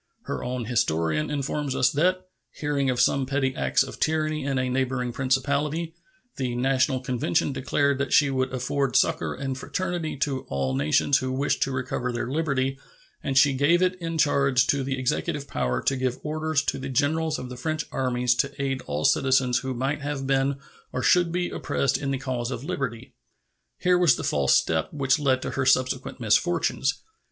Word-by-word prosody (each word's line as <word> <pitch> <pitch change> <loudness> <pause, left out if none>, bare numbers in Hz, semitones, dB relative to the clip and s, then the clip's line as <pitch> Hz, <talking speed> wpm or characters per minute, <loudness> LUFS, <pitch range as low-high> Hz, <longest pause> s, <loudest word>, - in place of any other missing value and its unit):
Her - - -4
own 125 -1 -3
historian 80 -9 0
informs 145 -1 -2
us 125 - +3
that, 185 +5 +1 0.3
hearing 145 -2 -1
of 125 -1 0
some 130 +1 +2
petty 135 -1 0
acts - - +2
of - - -9
tyranny 155 -1 0
in 135 -1 -1
a 130 -1 0
neighboring 125 -1 -1
principality, 140 +5 0 0.4
"the 125 -3 -2
National 130 +1 +1
Convention 125 -1 0
declared 140 +1 0
that 140 - -2
she 145 -2 +4
would 130 -1 0
afford 130 +1 -1
succor - - +2
and 135 0 -3
fraternity 170 +2 -3
to 135 -1 -1
all 65 -1 -1
nations 75 - +2
who 130 0 -3
wished 135 +2 0
to 135 - +1
recover 125 -1 -2
their 120 0 -3
liberty, 135 -3 -1 0.4
and 135 -1 -1
she 140 +1 +6
gave 150 +7 +3
it 185 0 +2
in 165 -1 -3
charge 140 -4 +3
to 140 0 +1
the 135 0 -2
executive 145 +3 -2
power 60 -1 -1
to 135 - +1
give 130 -1 -1
orders 155 -1 -1
to - - -2
the 135 +1 -5
generals 155 +4 +1
of 125 - -7
the 125 - -7
French 155 +4 -3
armies 125 -1 +1
to 140 +3 -2
aid 135 -1 -1
all 75 +1 -2
citizens 130 -2 +3
who 130 -1 -4
might 135 +4 -2
have 140 -1 -3
been 135 +1 +1 0.4
or 130 - -3
should 175 -2 +4
be 175 +1 -1
oppressed 135 - 0
in 140 - -3
the 135 - 0
cause 125 -2 -3
of 125 -1 -5
liberty." 130 -5 -4 0.6
Here 180 0 +3
was 165 -8 +5
the - - -5
false 70 -2 +2
step 80 -1 +1
which 140 0 +1
led 130 -3 +1
to - - -3
her 140 - -1
subsequent 130 0 +1
misfortunes. 135 +4 +1
135 Hz, 185 wpm, -25 LUFS, 125-145 Hz, 0.6 s, she